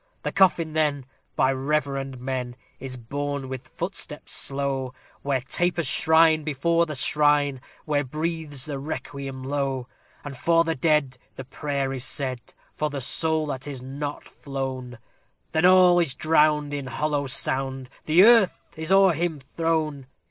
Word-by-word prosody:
The - - -2
coffin, 170 -5 +3
then, 150 -4 0 0.3
by 130 +1 +3
reverend 135 -1 -2
men, 125 -1 -4 0.2
is 130 -1 -7
borne 140 +3 -4
with 130 0 -7
footsteps 165 -1 -5
slow, 135 -2 -2 0.3
Where 140 -2 0
tapers 170 +5 -1
shine 160 +2 +4
before 165 +3 +1
the 150 - -5
shrine, 145 -1 +2 0.2
where 145 -2 +1
breathes 155 -1 -4
the 145 -3 -5
requiem 140 -2 -6
low; 135 -2 -2 0.4
And 145 -2 -7
for 165 +4 +3
the 165 -1 -1
dead 140 -3 +1 0.2
the 135 - -7
prayer 140 0 -3
is 130 -2 -4
said, 130 -3 -2 0.3
for 150 - -1
the 145 -1 -4
soul 160 +4 +1
that 135 -2 -5
is 135 -3 -6
not 145 +2 -5
flown 130 -3 -6 0.5
Then 160 +2 +2
all 180 -1 +7
is 155 -7 +1
drowned 150 -1 +2
in 140 -2 -4
hollow 145 +2 -1
sound, 130 0 -1 0.2
the 165 +4 +6
earth 225 -4 +4
is 160 +2 -5
o'er 195 -2 +6
him 165 -1 -2
thrown! 155 -1 -2
145 Hz, 150 wpm, -25 LUFS, 135-160 Hz, 0.5 s, all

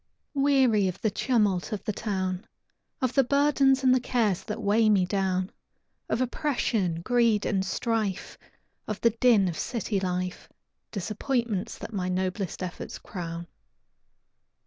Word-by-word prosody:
Weary 265 -8 +3
of 185 0 -4
the 220 - +1
tumult 210 -4 +1
of 210 - -3
the 210 - -2
town, 190 -2 -3 0.5
Of 255 -1 +1
the 270 - +5
burdens 275 0 +3
and 255 -1 +6
the 255 - +4
cares 230 -7 0
that 220 0 -4
weigh 215 +1 +3
me 195 -4 +4
down, 185 -1 -1 0.6
Of 240 - 0
oppression, 235 - 0
greed, 235 -1 +2
and 190 -2 +1
strife, 215 -1 -2 0.5
Of 215 -1 -3
the 230 - +4
din 225 -4 +4
of 170 - -3
city 225 -4 -1
life, 180 -1 -3 0.4
Disappointments 225 +1 -2
that - - -8
my 185 -2 -1
noblest 185 0 -2
efforts 180 -1 -6
crown. 170 -2 -6
210 Hz, 140 wpm, -27 LUFS, 185-240 Hz, 0.6 s, and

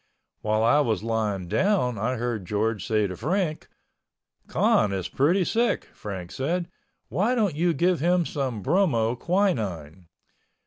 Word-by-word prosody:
While 110 +1 +1
I 120 +6 +4
was 110 -8 0
lying 105 -5 -1
down 150 - +1
I 125 +5 0
heard 115 -5 -3
George 105 -1 -1
say 110 -2 +2
to 90 -2 -4
Frank, 165 - -2 0.8
"Con 105 - +2
is 95 -2 -2
pretty 175 +7 +2
sick," 235 +5 0
Frank 95 -4 -7
said, 170 +6 -2 0.4
"Why 220 +7 +1
don't 210 -8 +1
you 170 +4 +1
give 180 0 +2
him 175 +3 +2
some 130 -10 -3
bromo 120 - +2
quinine?" 105 - -1
125 Hz, 140 wpm, -25 LUFS, 105-175 Hz, 0.8 s, I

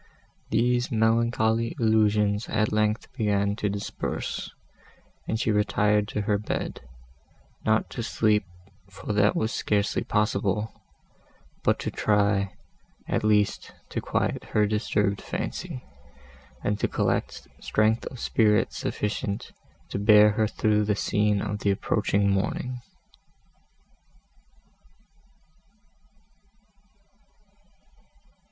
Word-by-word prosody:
These 120 +3 +1
melancholy 115 0 +2
illusions 105 -2 +2
at 110 -1 +1
length 105 +1 0
began 100 -4 +1
to 105 -2 -1
disperse, 100 0 -4 0.8
and 110 - -1
she 110 - +1
retired 105 0 +2
to 105 - -2
her 100 0 +1
bed, 105 - -4 0.9
not 110 0 +3
to 120 - -4
sleep, 110 -2 +2 0.5
for 95 +2 -5
that 105 0 +3
was 110 +1 0
scarcely 100 -1 0
possible, 105 0 0 0.9
but - - +3
to - - -3
try, 100 -2 +1 0.6
at - - -1
least, 105 -2 +1 0.2
to - - -3
quiet - - -1
her 105 -1 +2
disturbed 105 -1 0
fancy, 65 - -5 0.8
and 105 0 0
to - - +1
collect - - -1
strength 110 +2 +1
of 130 - -8
spirits 105 -3 +2
sufficient 105 -1 -3 0.4
to - - -3
bear 105 0 +7
her 110 +1 +1
through 105 -1 +1
the 105 0 +1
scene 105 0 +1
of 105 0 -3
the 100 - 0
approaching 100 +1 +1
morning. 115 +6 -1
105 Hz, 105 wpm, -26 LUFS, 105-110 Hz, 0.9 s, bear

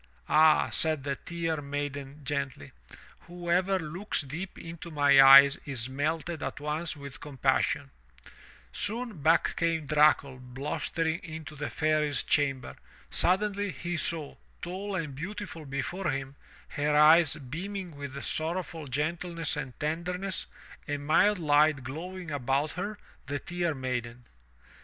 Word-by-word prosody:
"Ah," 155 0 +5
said 155 -4 +1
the 140 0 -1
Tear 165 -2 -3
Maiden 145 0 -5
gently, 140 - -3 0.6
"whoever 175 +2 0
looks 175 +4 -2
deep 160 +7 -6
into 165 0 -8
my 145 -3 +6
eyes 140 +1 +9
is 130 -4 -1
melted 155 +4 -2
at - - -4
once 155 +2 -3
with 140 +1 -9
compassion." 135 -5 0 0.8
Soon, 220 - -2
back 165 +4 +3
came 165 -2 0
Dracul 145 -3 +3
blustering 150 +6 -2
into 160 -2 -8
the 145 0 -4
Fairy's 155 -1 +1
chamber. 135 -3 0 0.4
Suddenly 205 +2 +1
he 175 +3 -4
saw, 160 -3 -2 0.2
tall 190 +3 -5
and 160 -6 -3
beautiful 165 +1 -6
before 140 +7 -3
him, 135 -1 -3 0.3
her 150 +1 0
eyes 155 0 +7
beaming 175 +5 -6
with 140 -1 -7
sorrowful 160 -1 -2
gentleness 165 +4 -2
and 135 -4 -6
tenderness, 180 +5 -3 0.4
a 145 -1 -1
mild 160 +8 +3
light 150 -3 +3
glowing 170 +6 -6
about 140 +2 0
her 205 +4 -4
— - - -30
the 145 +1 -2
Tear 175 0 -2
Maiden. 125 -2 -4
155 Hz, 130 wpm, -29 LUFS, 140-170 Hz, 0.8 s, eyes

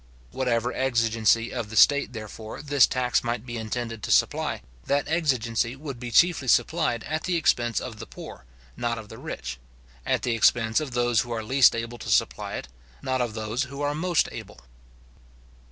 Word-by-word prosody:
Whatever 125 -2 0
exigency 115 -3 +1
of 115 -4 -4
the 110 - -8
state, 145 +5 +5
therefore, 110 +1 -8
this 145 -2 +5
tax 125 -2 0
might 120 0 -3
be 120 -1 -6
intended 115 0 -4
to - - -5
supply, - - +1 0.2
that 140 0 +1
exigency 125 -7 0
would 140 -3 -7
be 120 -1 -5
chiefly 165 +1 +3
supplied 155 -2 +2
at 155 +1 -3
the 180 - 0
expense 120 -8 +1
of 110 -3 -7
the - - -8
poor, - - -11 0.3
not 120 -1 -2
of 110 -2 -9
the - - -10
rich; 60 0 -6 0.4
at - - 0
the 120 - 0
expense 115 +1 +3
of 150 -5 -5
those 120 -2 +2
who 120 - -7
are 115 -1 -2
least 130 +3 +5
able 115 +1 -5
to - - -7
supply - - +1
it, - - -6 0.4
not 130 -1 0
of 120 -3 -2
those 110 +5 -2
who 140 +2 -6
are 145 0 0
most 175 +2 +1
able. - - -10
120 Hz, 185 wpm, -26 LUFS, 115-140 Hz, 0.4 s, state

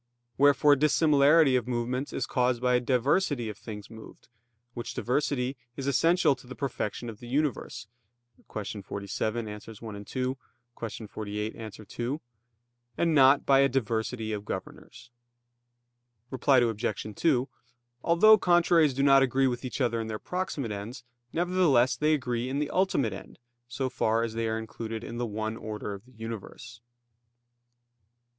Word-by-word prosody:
Wherefore 145 +1 +5
dissimilarity 150 0 +4
of 125 -2 0
movements 125 +3 -2
is - - -2
caused 125 -2 +1
by 125 0 +3
diversity 130 - +1
of 105 - -7
things 105 -3 -8
moved, 110 -1 -13 0.4
which 120 0 -6
diversity 130 0 -1 0.2
is 135 - -4
essential 165 +4 +3
to 130 - -16
the 130 - -8
perfection 120 -3 -3
of 110 -2 -8
the 120 - -10
universe 135 -2 -2 0.7
(Q. 105 -1 -5
47, 105 +4 -3
AA. - - -5
1,2; 110 +4 -5 0.6
Q. 110 - -8
48, 105 +1 -5
A. 110 -1 -9
2), 125 +9 -4 0.8
and 165 -1 +2
not 135 -1 +6
by 135 -1 +5
a 135 0 +5
diversity 110 -2 -2
of 105 -1 -4
governors. 120 +4 -8 1.2
Reply 135 +1 +3
Obj. 110 -3 -1
2: 135 -6 +2 0.6
Although 215 +6 +6
contraries 170 -5 +4
do 135 - +1
not 135 -1 +6
agree 135 +1 +2
with 125 -1 -1
each 130 - -5
other 120 -3 +1
in 110 - -5
their 110 -1 -3
proximate 165 - -3
ends, 105 +5 -6 0.3
nevertheless 165 -8 +3
they 150 +5 +2
agree 125 -3 -2
in 135 - -2
the 150 0 -1
ultimate 145 - +1
end, 95 - -10 0.3
so 130 +2 -2
far 115 -3 +1
as 115 -1 -3
they 115 0 -1
are 110 0 -1
included 110 0 -6
in 120 0 -6
the 120 - -1
one 110 +1 -3
order 105 -2 -5
of 100 +3 -10
the 130 - -21
universe. 115 0 -8
125 Hz, 150 wpm, -28 LUFS, 110-140 Hz, 1.2 s, not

